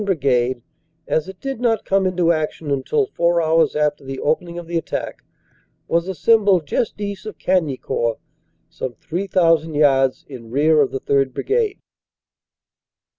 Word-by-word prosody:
Brigade, 130 - +1 0.4
as 155 +1 0
it 190 -1 -11
did 270 -3 -4
not 230 -3 +1
come 195 -1 +2
into 180 -2 +2
action 155 -1 -2
until 140 - +1
four 170 - +1
hours 160 0 +2
after 150 -1 0
the 135 0 -6
opening 170 +3 -1
of 175 - -6
the 170 +1 -6
attack, 165 - -3 0.6
was 170 +1 0
assembled 195 -2 +3
just 205 +9 -2
east 200 0 -5
of 215 - -7
Cagnicourt, 140 -9 0 0.5
some 130 -7 -6
3,000 165 -3 +1
yards 135 -3 +3
in 125 -5 -10
rear 150 +5 +3
of 140 - +2
the 135 - -5
3rd. 135 -2 +1
Brigade. 435 -2 0
165 Hz, 145 wpm, -20 LUFS, 140-190 Hz, 0.6 s, assembled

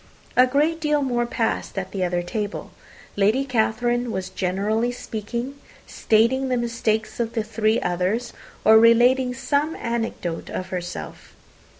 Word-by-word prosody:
A 255 +1 +6
great 305 +5 +1
deal 300 -2 +1
more 240 -2 0
passed 225 -3 -2
at 190 -1 -3
the 190 -2 -2
other 175 -1 0
table. 205 +3 -4 0.4
Lady 215 +7 +2
Catherine 240 0 0
was 190 -2 -4
generally 205 +6 0
speaking 240 +4 -5 0.3
stating 235 +5 +2
the 250 - +1
mistakes 230 -2 -1
of 230 -1 -1
the 225 - -1
three 215 +1 +1
others, 185 +7 -1 0.3
or 220 +1 +8
relating 250 +2 +4
some 290 +4 0
anecdote 225 -8 -3
of 185 0 -5
herself. 180 -1 -6
230 Hz, 135 wpm, -23 LUFS, 205-250 Hz, 0.4 s, or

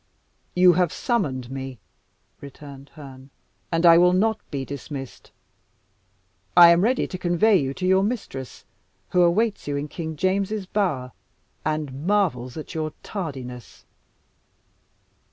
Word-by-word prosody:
"You 180 0 +6
have 175 -1 +1
summoned 135 - -2
me," 135 -1 -6 0.6
returned 140 0 -11
Herne; 135 -3 -12 0.4
"and 165 +1 +1
I 170 0 +8
will 180 +1 +5
not 220 +4 +1
be 135 -2 -4
dismissed. 140 -1 -8 1.3
I 170 -1 +10
am 170 +1 +4
ready 245 +6 +1
to 185 - -7
convey 185 +5 +3
you 135 -4 -2
to 185 - -4
your 190 +1 +4
mistress, 200 - -5 0.4
who 180 - +2
awaits 200 +4 +1
you 145 - -2
in 140 +1 -3
King 160 0 -6
James's 195 +4 -1
bower, 175 -11 -1 0.5
and 155 -1 -3
marvels 160 -12 0
at 155 - -7
your 155 -2 -3
tardiness." 130 - -7
165 Hz, 130 wpm, -23 LUFS, 135-185 Hz, 1.3 s, I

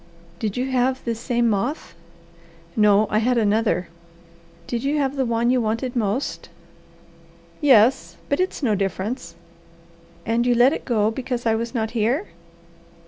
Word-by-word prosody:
"Did 215 -1 -3
you 260 +2 -2
have 260 +1 0
this 230 -1 -2
same 240 0 0
moth?" 230 +8 -2 0.8
"No, 210 -1 +4
I 215 - +3
had 245 +2 +1
another." 215 -4 +1 0.8
"Did 235 +4 -3
you 285 +2 0
have 275 -1 0
the 265 -2 0
one 235 +1 +1
you 255 -1 +2
wanted 230 +3 -2
most?" 225 +3 -2 1.1
"Yes 265 -2 +4
but 285 - 0
it's 370 -4 -2
no 225 -5 +2
difference." 200 +5 -3 0.9
"And 235 +2 +1
you 245 - +3
let 245 +4 +5
it - - -5
go 220 -3 +1
because 245 0 -4
I 225 - +3
was 230 +3 -3
not 220 -1 -1
here?" 240 - 0
235 Hz, 150 wpm, -22 LUFS, 220-260 Hz, 1.1 s, let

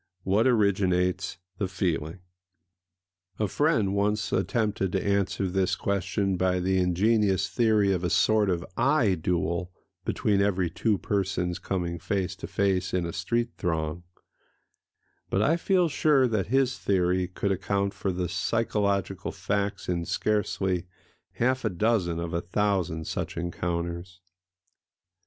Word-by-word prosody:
What 105 +6 +3
originates 95 -5 +1 0.2
the 100 - 0
feeling? 90 -2 -2 1.2
A 105 - 0
friend 110 - +1
once 105 +1 0
attempted 95 0 0
to 95 - -1
answer 100 -1 +1
this 95 +1 +1
question 100 0 -1
by 90 0 +1
the 95 +1 +1
ingenious 95 +2 +2
theory 105 0 +3
of 90 -1 -2
a 90 - +1
sort 105 +3 +3
of 85 -2 -1
eye 130 -7 +3
duel 85 +1 -1 0.3
between 100 -2 +1
every 95 -4 +1
two 105 +4 +1
persons 95 -3 -1
coming 85 -3 -3
face 95 -3 -2
to - - -7
face 95 -2 0
in 90 -2 0
a 85 - -4
street 115 +7 -1
throng; 80 -2 -2 1.3
but 100 - +1
I 155 +9 +3
feel 180 0 +2
sure 150 -4 +3
that 105 -5 0
his 130 +2 +1
theory 90 -1 +1
could 100 +2 -2
account 100 +1 0
for 95 - -2
the 90 0 -2
psychological 100 -3 -1
facts 100 -1 -2
in 85 -2 -1
scarcely 95 -4 0 0.5
half 130 +2 0
a 110 - +1
dozen 95 -3 +1
of 85 0 -4
a 85 - 0
thousand 90 -4 -1
such - - -4
encounters. 85 0 -3
95 Hz, 135 wpm, -27 LUFS, 90-105 Hz, 1.3 s, What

